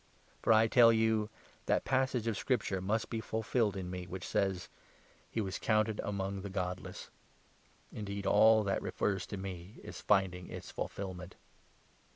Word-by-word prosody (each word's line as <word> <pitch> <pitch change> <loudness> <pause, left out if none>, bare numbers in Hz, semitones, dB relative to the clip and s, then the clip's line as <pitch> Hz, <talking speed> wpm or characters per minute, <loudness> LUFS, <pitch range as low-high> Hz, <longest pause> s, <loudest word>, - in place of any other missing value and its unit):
For, - - +3
I 110 0 +7
tell 115 0 +7
you, 110 -1 +2 0.4
that - - +2
passage 130 -3 +1
of 115 -2 0
Scripture 105 -4 0
37 95 0 -5
must 110 +2 0
be 115 - -1
fulfilled 110 -2 0
in 90 -1 -4
me, 90 -1 -5
which 90 0 -6
says 95 -2 0 0.2
— - - -29
' - - -31
He - - -3
was 95 -2 -3
counted 110 0 +1
among 100 -1 -3
the 100 - -6
godless 90 -1 -4 0.4
'; - - -34 0.3
indeed, 100 -1 -5
all 110 +2 +6
that 100 -1 0
refers 95 -3 -1
to 100 - -5
me 95 +1 -7
is - - -8
finding 95 -3 +1
its - - -8
fulfilment." 95 -2 -5
100 Hz, 175 wpm, -33 LUFS, 95-110 Hz, 0.4 s, I